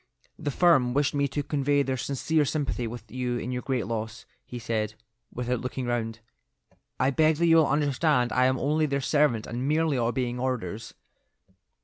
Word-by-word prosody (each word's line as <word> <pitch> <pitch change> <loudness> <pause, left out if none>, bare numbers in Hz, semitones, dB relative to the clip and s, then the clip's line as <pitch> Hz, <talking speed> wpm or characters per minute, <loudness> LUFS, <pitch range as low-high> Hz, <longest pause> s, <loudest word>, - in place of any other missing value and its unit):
"The 145 - -2
firm 135 -5 +3
wished 145 -1 +2
me 140 -1 +1
to 145 +1 -3
convey 145 0 +1
their 130 -1 -1
sincere 140 +5 0
sympathy 140 -5 -2
with 115 -1 -9
you 125 -1 -2
in 120 +1 -4
your 125 0 -2
great 130 -6 -1
loss," 110 0 -5 0.2
he 125 - -8
said, 110 -2 -2 0.4
without 125 0 -2
looking 125 0 -4
round. 115 -2 -2 0.8
"I 130 +2 +3
beg 155 +2 +3
that 170 +3 +1
you 165 -1 +6
will 160 -3 +5
understand 145 -2 +1
I 125 0 +3
am 130 0 +2
only 150 +4 +1
their 140 -1 0
servant 140 -6 +2
and 125 +3 -4
merely 155 -2 +1
obeying 120 +1 -1
orders." 115 -5 -3
130 Hz, 175 wpm, -27 LUFS, 120-145 Hz, 0.8 s, you